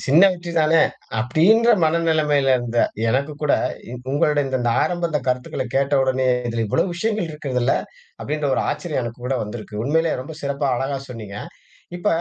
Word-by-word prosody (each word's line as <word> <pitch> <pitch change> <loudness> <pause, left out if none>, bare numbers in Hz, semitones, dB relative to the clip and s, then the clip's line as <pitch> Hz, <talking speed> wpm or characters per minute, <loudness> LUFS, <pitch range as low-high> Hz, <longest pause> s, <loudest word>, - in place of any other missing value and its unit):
"சின்ன 150 +6 +5
வெற்றி 175 -1 -7
தானே" 155 +1 +4 0.4
அப்படின்ற 190 - +4 0.2
மனநிலைமையில 155 -4 +2
இருந்த 120 -1 -3 0.3
எனக்கு 140 +6 0
கூட 145 - +2 0.4
இ - - -7 0.2
உங்களுடைய 150 -1 +2
இந்த 130 - -1
த - - +3
ஆரம்ப 175 -1 -1
இந்த 150 -2 0
கருத்துக்களை 125 0 -2
கேட்ட 140 +1 +2
உடனே, 130 0 +1 0.2
"இதில் 115 -1 -1
இவ்வளவு 175 - 0
விஷயங்கள் 210 -2 -1
இருக்குதுல்ல!" 135 -4 -1 0.5
அப்படின்ற 150 -1 -2
ஒரு - - 0
ஆச்சரியம் 150 -2 -3
எனக்கு 115 +1 -7
கூட 135 - 0
வந்திருக்கு. 105 -1 -7
உண்மையிலே 160 +3 +1
ரொம்ப 150 +4 -8
சிறப்பா 140 0 -1
அழகா 135 +1 -2
சொன்னீங்க. 105 -4 -8 0.6
இப்ப - - -7
145 Hz, 160 wpm, -21 LUFS, 125-160 Hz, 0.6 s, சின்ன